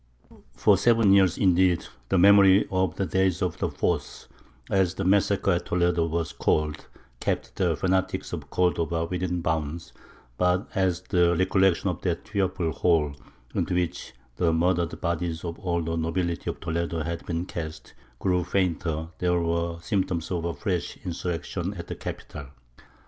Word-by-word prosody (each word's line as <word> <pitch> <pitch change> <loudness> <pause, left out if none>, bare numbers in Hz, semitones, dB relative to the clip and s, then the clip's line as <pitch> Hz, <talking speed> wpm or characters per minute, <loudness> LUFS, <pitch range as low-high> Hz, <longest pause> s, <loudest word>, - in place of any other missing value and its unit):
For - - +4
seven 115 -4 +4
years, 95 -3 +4
indeed, 90 -2 +3 0.2
the - - +2
memory 100 +1 +6
of 95 -3 0
the 95 - -1
"Day 95 0 +2
of - - -2
the - - 0
Foss," - - -2 0.4
as 95 -2 +1
the 95 - -2
massacre 100 +1 +2
at 85 - -1
Toledo 85 -1 +1
was 85 -1 -2
called, 75 0 0 0.3
kept - - -2
the 90 -3 +2
fanatics 95 +4 -1
of - - -6
Cordova 85 -2 0
within 90 0 -2
bounds; 80 0 -3 0.5
but 90 +3 +2
as 95 -4 +1
the 85 -1 +2
recollection 95 0 +2
of 90 - -8
that 85 -2 -2
fearful 95 -5 -1
hole 80 -4 +2 0.4
into 90 - -1
which 90 -1 -2 0.2
the 85 -2 +2
murdered 85 0 +1
bodies 85 0 -2
of 85 -1 -5
all 85 -3 -1
the 80 +1 -2
nobility 85 +1 -2
of - - -5
Toledo 85 -1 -2
had 85 +1 -4
been 85 0 -2
cast, 80 -3 -7 0.2
grew 90 +4 +1
fainter, 85 -3 -1
there 90 -1 +2
were 85 0 -1
symptoms 90 -2 -1
of 85 -2 -1
a 85 - -1
fresh 90 -5 -2
insurrection 85 -2 -3
at - - -7
the - - -6
capital. 75 -2 -7
85 Hz, 155 wpm, -26 LUFS, 85-95 Hz, 0.5 s, memory